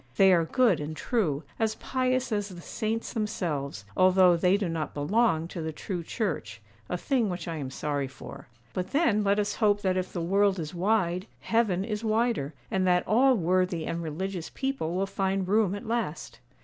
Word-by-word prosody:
They 190 -1 +7
are 170 -2 +3
good 230 - +3
and 155 +1 -5
true, 165 - 0 0.2
as 220 -1 +1
pious 255 0 -1
as 205 -1 -1
the 180 -2 -9
saints 225 +5 -3
themselves, 150 - -3
although 185 -1 +5
they 180 +3 +3
do 200 -3 -1
not 165 -2 -3
belong 165 +2 +2
to 175 - -5
the 160 0 -3
true 175 +3 -4
Church, 160 - -3 0.3
a 180 - -1
thing 240 +1 +1
which 175 -2 -5
I 165 -1 -3
am 135 -3 -4
sorry 140 0 -2
for; 135 0 -11 0.3
but 185 0 -4
then 235 -9 +3
let 200 0 +2
us 205 -1 0
hope 205 -2 +3
that 185 -1 +1
if 185 0 -2
the 175 - -4
world 195 +3 +2
is 155 -2 -5
wide, 185 0 +1
heaven 205 -5 +1
is 210 0 -3
wider, 220 - 0 0.2
and 190 -1 +1
that 180 0 +2
all 255 +4 +5
worthy 180 -2 +1
and 170 - -3
religious 170 +2 -4
people 265 -12 -2
will 190 +1 +1
find 195 -1 -1
room 205 -1 +2
at 205 - -7
last. 225 -9 -3
185 Hz, 190 wpm, -28 LUFS, 165-215 Hz, 0.3 s, They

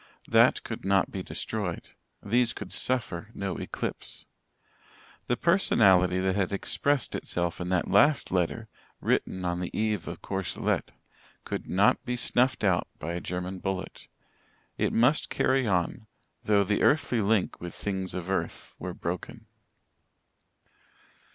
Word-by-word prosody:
That - - +5
could - - -6
not 95 0 +2
be 95 - -4
destroyed 95 -1 -4 0.3
these 120 +3 +2
could - - -8
suffer 110 -6 -2
no 95 -2 -3
eclipse. - - -5 1.0
The 120 - +1
personality 95 - +4
that 95 0 +1
had 100 -2 0
expressed 140 +7 0
itself 85 0 -2
in 90 - -3
that 90 -1 +1
last 145 0 +4
letter, 95 +5 0 0.3
written 95 -1 0
on 90 0 -1
the 90 - -3
eve 105 -4 0
of - - -7
Courcelette, 95 -2 -1 0.5
could - - -4
not 100 +3 +3
be 125 -1 -2
snuffed 125 0 +1
out 95 -4 +2
by 85 +2 -4
a 85 - -3
German 90 +1 -4
bullet. 95 0 -4 0.7
It - - 0
must 125 +7 +3
carry 130 -2 +2
on, 95 +3 0 0.4
though 105 -1 +4
the 100 +1 0
earthly 130 -6 +3
link 105 -1 +1
with 85 -1 -6
things 95 -2 -3
of 90 -1 -4
earth 95 - -3
were 90 -1 -5
broken. 85 +1 -5
95 Hz, 140 wpm, -28 LUFS, 90-115 Hz, 1.0 s, That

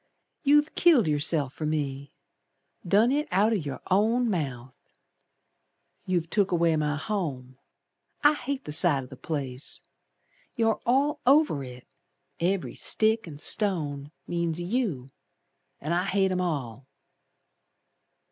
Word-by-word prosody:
You've 295 +1 +3
killed 310 - +4
yourself 145 -2 0
for 155 - -4
me. 140 -2 -3 0.8
Done 210 +7 +4
it 295 +2 0
out 200 +5 +3
o' - - +2
your 145 -9 -4
own 225 +5 +2
mouth. 130 -8 -4 1.3
You've 175 -3 0
took 200 -2 +2
away 170 -2 +2
my 150 -1 0
home, 145 -7 -4 0.6
I 295 +1 +6
hate 275 -1 -4
the - - -5
sight 150 -3 +3
o' - - -9
the 130 - -11
place. 135 -2 -5 0.7
You're 225 -3 +1
all 275 +4 +2
over 275 - +4
it, 125 -1 -10 0.5
Every 180 +2 -1
stick 220 -1 +1
an' 150 -3 -9
stone 150 -6 -1
means 170 -1 -2
you, 175 - -2 0.7
An' 155 +4 -3
I 180 +2 +1
hate 195 -1 +1
'em 185 0 0
all." 135 -7 -4
170 Hz, 130 wpm, -27 LUFS, 145-220 Hz, 1.3 s, I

